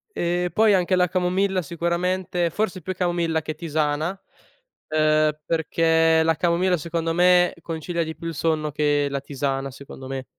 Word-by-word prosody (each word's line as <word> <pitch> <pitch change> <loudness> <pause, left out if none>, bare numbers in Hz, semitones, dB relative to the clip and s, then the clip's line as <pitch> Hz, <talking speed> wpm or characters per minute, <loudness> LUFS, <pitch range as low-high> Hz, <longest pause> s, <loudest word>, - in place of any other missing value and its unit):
Ehm, 175 +1 0
poi 215 -2 +4
anche 185 0 +2
la 180 0 +3
camomilla 185 +1 0
sicuramente 170 +2 -1
forse 185 -1 -2
più 185 +3 -3
camomilla 170 -3 0
che 155 0 -5
tisana, 155 -1 -1 0.8
uhm, 155 0 +3
perché 165 0 +2
la 165 0 +2
camomilla, 175 +3 +1
secondo 165 +1 -2
me, 180 +1 +4
concilia 165 +1 -3
di 160 0 -6
più 165 - -7
il 165 - -4
sonno 155 -1 0
che 145 0 +1
la 140 0 -2
tisana, 135 -1 -3
secondo 135 0 -11
me. 135 0 -5
165 Hz, 155 wpm, -23 LUFS, 155-180 Hz, 0.8 s, poi